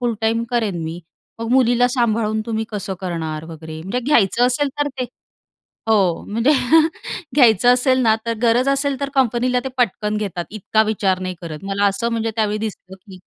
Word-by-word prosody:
फुल 240 -2 0
time 225 +1 +1
करेन 220 -8 -1
मी." 165 +2 -5 0.4
"मग 230 - -3
मुलीला 245 -1 +4
सांभाळून 220 -2 +1
तुम्ही 225 -1 -2
कसं 205 -2 -4
करणार?" 160 -4 -4
वगैरे. 160 0 -8
म्हणजे 195 +8 -2
घ्यायचं 240 -3 +3
असेल 275 +3 +1
तर 290 - +1
ते 255 - 0 0.8
हो, 195 -6 +2
म्हणजे 230 +6 +1 0.8
घ्यायचं 245 -4 +5
असेल 255 +1 +2
ना 220 -2 +4
तर 230 - 0
गरज 245 +3 +3
असेल 275 0 0
तर 280 - -1
कंपनीला 250 -1 +2
ते 265 - -2
पटकन 210 -2 0
घेतात. 195 -5 -3
इतका 215 +1 +1
विचार 195 -3 0
नाही 185 0 -4
करत. 160 -3 -7
मला 200 +1 +1
असं 200 +4 0
म्हणजे 225 0 -1
त्यावेळी 215 -1 0
दिसलं 190 -2 -9
की 190 0 -14
220 Hz, 175 wpm, -20 LUFS, 190-245 Hz, 0.8 s, घ्यायचं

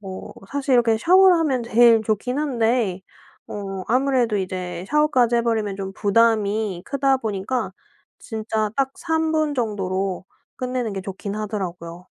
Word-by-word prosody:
뭐 190 -2 -8 0.2
사실 275 -1 0
이렇게 230 -2 +3
샤워를 370 +6 +6
하면 275 -7 0
제일 230 -1 +5
좋긴 220 +5 -1
한데, 235 -8 0 0.5
어. 195 -2 -6
아무래도 250 -2 +2
이제 185 -2 -4
샤워까지 260 -6 +3
해 235 - +2
버리면 220 -4 -1
좀 195 -1 -5
부담이 210 -3 +1
크다 275 -1 +1
보니까 220 +2 -3 0.5
진짜 220 -1 -3
딱 270 -1 +1
3 320 -2 0
정도로 195 -6 -2 0.3
끝내는 250 -4 -3
게 195 - -4
좋긴 195 +1 -6
하더라고요. 180 -5 -5
225 Hz, 285 characters per minute, -22 LUFS, 195-260 Hz, 0.5 s, 샤워를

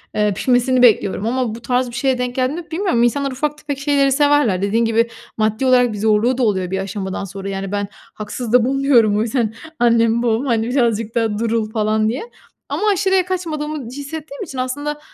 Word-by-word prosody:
Eee, 210 -1 +2
pişmesini 250 +3 +2
bekliyorum 215 -4 +3
ama 240 -1 -1
bu 235 - -10
tarz 250 +1 0
bir 235 - -9
şeye 265 0 +1
denk 250 0 -3
geldiğimde 290 +7 -2
bilmiyorum. 330 -8 +1
İnsanlar 275 +3 +1
ufak 295 +3 -2
tefek 290 -2 -5
şeyleri 275 -1 +2
severler. 285 -9 +3
Dediğin 220 +4 +1
gibi, 230 +1 +2 0.3
maddi 220 +3 0
olarak 250 -3 +4
bir - - -5
zorluğu 220 +4 +2
da 260 - +1
oluyor 190 -5 0
bir 190 - -1
aşamadan 195 0 -4
sonra. 195 0 -6
Yani, 195 0 -4
ben 205 0 -2 0.3
haksız 215 +2 -5
da 250 -2 +5
bulmuyorum 260 -6 +3
o - - +1
yüzden 230 -1 -1 0.3
annemle 230 -1 +3
babamı, 235 +3 0
hani, 230 -2 0
birazcık 230 -4 0
da 225 -3 0
durul 225 -1 -1
falan 215 0 +1
diye 250 +6 -3 0.5
ama - - -3
aşırıya 380 -1 +2
kaçmadığımı 310 -6 -3
hissettiğim 285 - -7
için 290 -8 -8
aslında, 290 +4 -3
240 Hz, 190 wpm, -19 LUFS, 215-275 Hz, 0.5 s, da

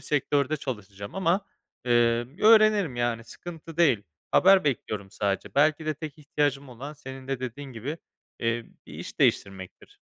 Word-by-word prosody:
sektörde 145 +1 0
çalışacağım 100 -7 -7
ama, 190 0 +2 0.4
emm, 120 +3 +2
öğrenirim, 215 - +5
yani, 120 -1 -1
sıkıntı 165 +4 -10
değil. 140 -11 +4 0.3
Haber 195 -1 +6
bekliyorum 105 -8 -2
sadece. 100 -1 -2
Belki 155 +2 +3
de 155 - 0
tek 155 +1 -8
ihtiyacım 145 -2 -1
olan 130 +5 -8
senin 135 -2 -10
de 135 -2 -2
dediğin 130 +2 -6
gibi, 135 +9 -5 0.4
eee, 115 0 -1 0.2
bir - - -12
iş - - -8
değiştirmektir. 95 -1 -1
135 Hz, 140 wpm, -27 LUFS, 115-155 Hz, 0.4 s, Haber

